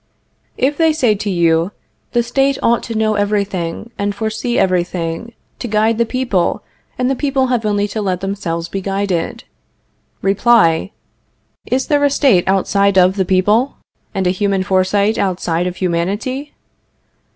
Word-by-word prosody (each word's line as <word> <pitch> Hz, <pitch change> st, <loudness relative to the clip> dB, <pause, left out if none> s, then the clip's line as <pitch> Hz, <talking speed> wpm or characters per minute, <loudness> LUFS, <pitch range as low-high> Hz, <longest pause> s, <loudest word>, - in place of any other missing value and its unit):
If 280 Hz, +3 st, +1 dB
they 320 Hz, -1 st, +3 dB
say 250 Hz, -8 st, +2 dB
to 205 Hz, 0 st, -3 dB
you: 170 Hz, 0 st, +2 dB, 0.4 s
The 240 Hz, -1 st, +2 dB
State 270 Hz, +3 st, +1 dB
ought 235 Hz, 0 st, +3 dB
to 230 Hz, -, -5 dB
know 215 Hz, 0 st, +2 dB
everything, 205 Hz, -1 st, -2 dB
and 200 Hz, 0 st, -1 dB
foresee 220 Hz, +3 st, -2 dB
everything, 180 Hz, +3 st, -1 dB, 0.3 s
to 245 Hz, -, -4 dB
guide 220 Hz, +1 st, +1 dB
the 235 Hz, -, +2 dB
people, 240 Hz, -8 st, 0 dB, 0.3 s
and 250 Hz, -, 0 dB
the 270 Hz, -, +1 dB
people 265 Hz, -2 st, 0 dB
have 225 Hz, -3 st, 0 dB
only 205 Hz, 0 st, +1 dB
to 215 Hz, +1 st, -3 dB
let 185 Hz, -3 st, -1 dB
themselves 185 Hz, -4 st, -3 dB
be 195 Hz, +3 st, -4 dB
guided 195 Hz, -3 st, -2 dB, 0.8 s
Reply: 195 Hz, -4 st, +3 dB, 0.8 s
Is 260 Hz, +1 st, 0 dB
there 290 Hz, -1 st, +2 dB
a 285 Hz, -, +4 dB
State 265 Hz, -, +3 dB
outside 200 Hz, +1 st, +2 dB
of 185 Hz, +1 st, +5 dB
the 190 Hz, -2 st, 0 dB
people, 205 Hz, +8 st, +2 dB, 0.4 s
and 190 Hz, -1 st, -2 dB
a 180 Hz, -, +3 dB
human 195 Hz, 0 st, 0 dB
foresight 195 Hz, +3 st, +1 dB
outside 180 Hz, -2 st, 0 dB
of 180 Hz, -, -4 dB
humanity? 200 Hz, -, -2 dB
200 Hz, 150 wpm, -17 LUFS, 185-235 Hz, 0.8 s, of